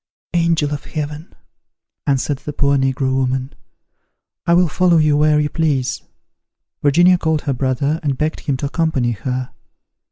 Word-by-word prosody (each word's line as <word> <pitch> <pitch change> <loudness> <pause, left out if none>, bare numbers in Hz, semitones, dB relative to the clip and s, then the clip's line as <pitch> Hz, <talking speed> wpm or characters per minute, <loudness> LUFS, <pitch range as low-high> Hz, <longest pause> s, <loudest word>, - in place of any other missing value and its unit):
"Angel 165 -4 +1
of 145 - -6
heaven!" 150 +1 -6 0.7
answered 140 0 0
the 150 - -7
poor 140 0 +2
negro 135 0 0
woman, 130 0 -1 0.9
"I 170 - +5
will 180 0 +4
follow 175 +2 +3
you 155 -2 +3
where 150 0 +3
you 150 - +1
please!" 145 -6 0 0.8
Virginia 175 +5 +4
called 160 -2 0
her 140 - -1
brother, 135 +4 -1
and 140 -5 -1
begged 155 +3 -1
him 140 -3 -2
to 140 - -3
accompany 140 -5 0
her. 125 +3 -4
145 Hz, 150 wpm, -19 LUFS, 135-160 Hz, 0.9 s, I